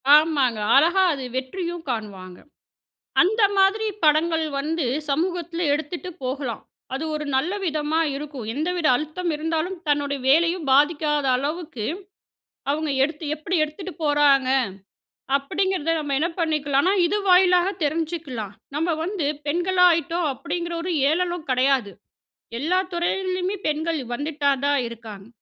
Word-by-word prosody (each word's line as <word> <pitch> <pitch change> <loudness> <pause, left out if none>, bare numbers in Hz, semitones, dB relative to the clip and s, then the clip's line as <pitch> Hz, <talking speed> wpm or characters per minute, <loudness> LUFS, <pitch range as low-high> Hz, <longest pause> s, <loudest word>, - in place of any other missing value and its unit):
ஆமாங்க. 285 -7 +3 0.2
அழகா 340 +7 +5
அது 275 -2 -5
வெற்றியும் 335 +6 -4
காணுவாங்க. 195 -6 -5 0.8
அந்த 435 +5 +2 0.2
மாதிரி 395 +3 +3 0.2
படங்கள் 320 +1 +3
வந்து 310 +1 -1 0.2
சமூகத்தில 340 +2 -1
எடுத்துட்டு 315 +5 -4
போகலாம். 255 -3 -3 0.3
அது 270 - -2
ஒரு 300 0 -4
நல்ல 305 +8 +1
விதமா 310 -1 0 0.2
இருக்கும். 280 -5 -6
எந்தவித 335 +3 -1
அழுத்தம் 310 +5 -3
இருந்தாலும், 325 +4 -2
தன்னுடைய 285 -1 0
வேலையும் 335 +2 +3
பாதிக்காத 295 +1 +3
அளவுக்கு, 290 -4 -4 0.9
அவுங்க 305 +1 -1
எடுத்து 315 +3 -5
எப்பிடி 320 +4 -2
எடுத்துட்டு 340 +5 -8
போறாங்க. 290 -3 +4 0.9
அப்பிடிங்கிறத 330 +3 -1
நம்ம 285 -2 -2
என்ன 335 +3 +1
பண்ணிக்கலான்னா, 300 +1 +1
இது 400 +5 +1
வாயிலாக 360 0 +5
தெரிஞ்சுக்கலாம். 300 - -3 0.2
நம்ம 325 +2 0
வந்து 355 -4 -2 0.2
பெண்களா 360 +4 +3
ஆயிட்டோம். 330 +1 -1
அப்பிடிங்கிற 340 +5 -4
ஒரு 360 0 -2 0.2
ஏளனம் 345 0 -1
கிடையாது. 255 -5 +2 0.7
எல்லா 345 +7 +1
துறையிலயுமே 370 +2 -1
பெண்கள் 315 +1 -1 0.2
வந்துட்டே 290 +1 0
தான் 285 0 +2
இருக்காங்க. 220 -4 -10
310 Hz, 120 wpm, -23 LUFS, 280-345 Hz, 0.9 s, அழகா